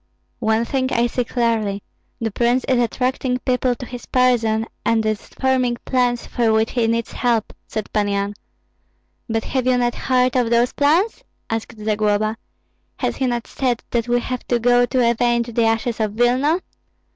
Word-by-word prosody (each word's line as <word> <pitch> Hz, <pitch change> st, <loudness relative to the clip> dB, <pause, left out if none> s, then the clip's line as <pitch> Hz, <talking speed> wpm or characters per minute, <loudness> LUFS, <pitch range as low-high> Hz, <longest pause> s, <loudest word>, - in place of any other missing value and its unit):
"One 220 Hz, 0 st, +1 dB
thing 260 Hz, +1 st, -1 dB
I 235 Hz, -1 st, +2 dB
see 245 Hz, +1 st, -1 dB
clearly: 225 Hz, -5 st, -1 dB, 0.4 s
the 225 Hz, -1 st, -2 dB
prince 240 Hz, +4 st, +1 dB
is 255 Hz, -2 st, +1 dB
attracting 250 Hz, +2 st, 0 dB
people 250 Hz, 0 st, 0 dB
to 250 Hz, -, -8 dB
his 245 Hz, 0 st, -9 dB
person, 230 Hz, -3 st, +2 dB, 0.2 s
and 225 Hz, -1 st, +1 dB
is 215 Hz, -1 st, -2 dB
forming 255 Hz, -2 st, 0 dB
plans 245 Hz, -2 st, +1 dB
for 230 Hz, -2 st, +1 dB
which 220 Hz, 0 st, +2 dB
he 235 Hz, -2 st, +1 dB
needs 230 Hz, 0 st, -1 dB
help." 235 Hz, -3 st, 0 dB
said 215 Hz, -1 st, -5 dB
Pan 210 Hz, -1 st, +1 dB
Yan. 200 Hz, 0 st, -1 dB, 1.0 s
"But 225 Hz, 0 st, 0 dB
have 255 Hz, -2 st, -1 dB
you 255 Hz, -1 st, +4 dB
not 240 Hz, -1 st, +1 dB
heard 255 Hz, -1 st, +1 dB
of 245 Hz, -3 st, +2 dB
those 235 Hz, +1 st, +2 dB
plans?" 330 Hz, +10 st, +2 dB, 0.3 s
asked 225 Hz, 0 st, -4 dB
Zagloba. 215 Hz, 0 st, 0 dB, 0.6 s
"Has -, -, -2 dB
he 265 Hz, -, 0 dB
not 240 Hz, -1 st, -2 dB
said 250 Hz, -3 st, -2 dB
that 235 Hz, -1 st, 0 dB
we 240 Hz, 0 st, +2 dB
have 255 Hz, 0 st, -4 dB
to 245 Hz, -, +2 dB
go 245 Hz, +1 st, +3 dB
to 250 Hz, -2 st, +2 dB
avenge 235 Hz, 0 st, +1 dB
the 230 Hz, 0 st, +2 dB
ashes 225 Hz, +1 st, 0 dB
of 215 Hz, -2 st, 0 dB
Vilna? 255 Hz, +9 st, +2 dB
240 Hz, 175 wpm, -21 LUFS, 225-250 Hz, 1.0 s, you